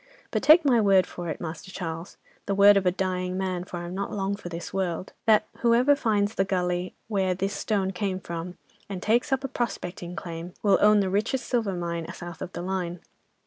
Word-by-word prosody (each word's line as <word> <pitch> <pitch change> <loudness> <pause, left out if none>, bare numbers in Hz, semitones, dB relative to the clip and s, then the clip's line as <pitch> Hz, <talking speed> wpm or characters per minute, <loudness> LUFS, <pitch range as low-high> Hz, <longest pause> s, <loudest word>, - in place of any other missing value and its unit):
But, - - 0
take 315 +1 +7
my 245 -5 +5
word 195 -3 +5
for 175 -1 -6
it, 155 - -4
Master 165 +1 -6
Charles, 165 -2 -6 0.3
the 200 - 0
word 200 +1 +8
of 195 -2 +2
a - - +5
dying 185 0 -2
man, 185 -2 -2
for 180 - -6
I'm 175 +1 -6
not 200 +1 -3
long 200 0 -1
for 200 -3 -8
this 170 0 -6
world, 185 -2 -2
that 215 -1 +5
whoever 245 +4 +4
finds 210 -5 +1
the 195 - +2
gully 180 -1 -1
where 190 -4 +1
this 195 +2 -2
stone 195 -3 0
came 185 0 -2
from, 170 0 -6 0.3
and 195 -2 -4
takes 235 +5 +2
up 265 0 +1
a - - -1
prospecting 180 -8 -4
claim, 170 -1 -7
will 200 -2 +4
own 210 0 +6
the 190 - 0
richest 220 +6 0
silver 225 -6 0
mine, 170 -1 -3
south 175 -2 -9
of 180 - -5
the - - -5
line. 180 -2 -3
190 Hz, 210 wpm, -26 LUFS, 175-205 Hz, 0.3 s, word